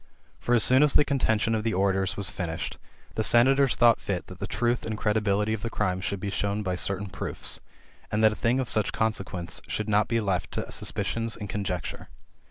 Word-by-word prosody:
For 120 - +1
as 115 - +3
soon 130 +2 +5
as 150 -1 +4
the 145 - +5
contention 115 -5 +1
of 110 -1 0
the 115 -3 0
orators 95 0 +1
was 100 -3 0
finished, 80 -3 -4 0.3
the 110 - -1
senators 135 +4 +5
thought 120 -1 +4
fit 95 -3 -3
that 90 0 -12
the 100 - -4
truth 120 +1 0
and 110 -1 -4
credibility 105 0 +1
of 110 - -3
the 115 - -3
crimes 95 -4 -1
should 100 -2 -2
be 100 +1 -4
shown 100 +2 -1
by 95 -2 -1
certain 100 +2 -1
proofs, 95 - -3 0.5
and 105 +1 +1
that 110 -1 +5
a - - -7
thing 120 +3 +1
of 130 - -1
such 110 -2 +1
great - - -9
consequence 95 -6 -2
should 105 - -3
not 105 0 +2
be 115 0 +1
left 100 -4 -1
to - - -4
suspicions 115 0 -1
and 105 -3 -7
conjec 95 -4 -2
ture. - - -8
105 Hz, 220 wpm, -27 LUFS, 100-115 Hz, 0.5 s, soon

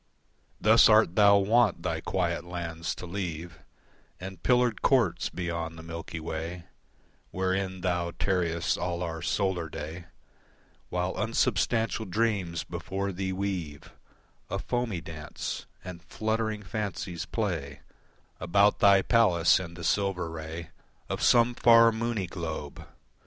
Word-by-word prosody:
Thus 110 +2 +6
art 110 -5 +5
thou 100 -1 +7
wont 100 -3 +3
thy 80 -3 -2
quiet 85 -2 -1
lands 85 -2 -4
to - - -8
leave 85 -2 -5 0.6
And 95 -2 -8
pillared 125 -3 +2
courts 120 -10 +2
beyond 85 -2 -4
the 80 - -9
Milky 80 0 -6
Way, 80 +2 -5 0.7
Wherein 95 0 -2
thou 85 -2 0
tarriest 85 -3 0
all 90 0 -2
our 80 -1 -4
solar 95 -5 -1
day 80 +3 -7 0.8
While 90 +1 -2
unsubstantial 115 -1 0
dreams 95 -5 -1
before 100 +1 -4
thee 95 +1 -3
weave 95 -6 -4 0.6
A 95 - -2
foamy 115 -3 -2
dance, 80 -2 -6 0.2
and 90 -2 -8
fluttering 110 +3 -2
fancies 95 -5 -4
play 80 -10 -3 0.6
About 100 +4 +3
thy 100 -1 +6
palace 95 -9 +4
in 85 -2 -7
the 85 - -9
silver 95 -2 0
ray 80 +1 -7 0.4
Of - - -3
some 120 0 +5
far, 115 -1 +6
moony 115 -3 -2
globe. 80 -4 -6
90 Hz, 125 wpm, -28 LUFS, 85-105 Hz, 0.8 s, thou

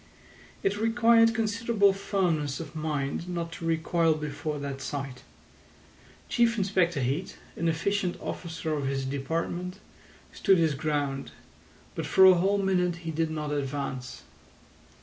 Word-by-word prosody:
It 195 +1 +1
required 230 0 +4
considerable 220 -2 +2
firmness 175 -8 -1
of 160 -2 -8
mind 155 +1 -2
not 170 -1 -3
to 165 - -7
recoil 165 0 +2
before 150 0 -4
that 140 -1 -5
sight. 135 -2 -5 1.1
Chief 235 -1 +2
Inspector 185 -5 +1
Heat, 135 +8 -2 0.2
an 170 - -1
efficient 180 +3 0
officer 165 -2 -4
of 145 -3 -1
his 135 -1 -1
department, 165 +7 -3 0.6
stood 195 - +4
his 160 -3 +2
ground, 140 -1 -2 0.6
but - - -4
for 190 - +6
a 190 - +9
whole 190 +3 +2
minute 185 -3 +1
he 165 - -2
did 160 +1 0
not 150 -1 -3
advance. 135 -3 -4
165 Hz, 130 wpm, -28 LUFS, 145-190 Hz, 1.1 s, a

